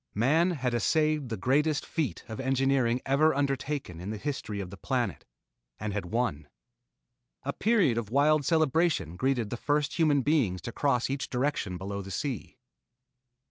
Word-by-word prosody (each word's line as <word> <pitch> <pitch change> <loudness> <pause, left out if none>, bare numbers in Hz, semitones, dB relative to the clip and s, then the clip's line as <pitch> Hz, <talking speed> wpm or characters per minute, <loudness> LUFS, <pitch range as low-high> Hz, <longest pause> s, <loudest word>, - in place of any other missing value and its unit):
Man 150 - +3
had 130 -8 -1
essayed 150 +4 +1
the 110 - -3
greatest 145 +8 +1
feat 155 -6 -2
of 110 - -7
engineering 130 -2 +1
ever 140 +3 +3
undertaken 140 - -2
in 95 - -5
the 110 - -3
history 110 -5 -4
of 95 -2 -5
the - - -7
planet, 120 - -2 0.5
and 105 0 -3
had 100 -3 -3
won. 90 -8 -1 1.0
A 140 - -2
period 200 - +2
of 110 -3 -6
wild 145 +4 +3
celebration 155 - +2
greeted 125 -1 0
the 120 - -2
first 145 +5 0
human 145 -4 +4
beings 130 - +2
to 115 - -4
cross 125 -2 +1
each 135 0 -3
direction 125 -8 -1
below 100 +2 -4
the 95 - -9
sea. 130 +4 -4
130 Hz, 160 wpm, -29 LUFS, 110-145 Hz, 1.0 s, human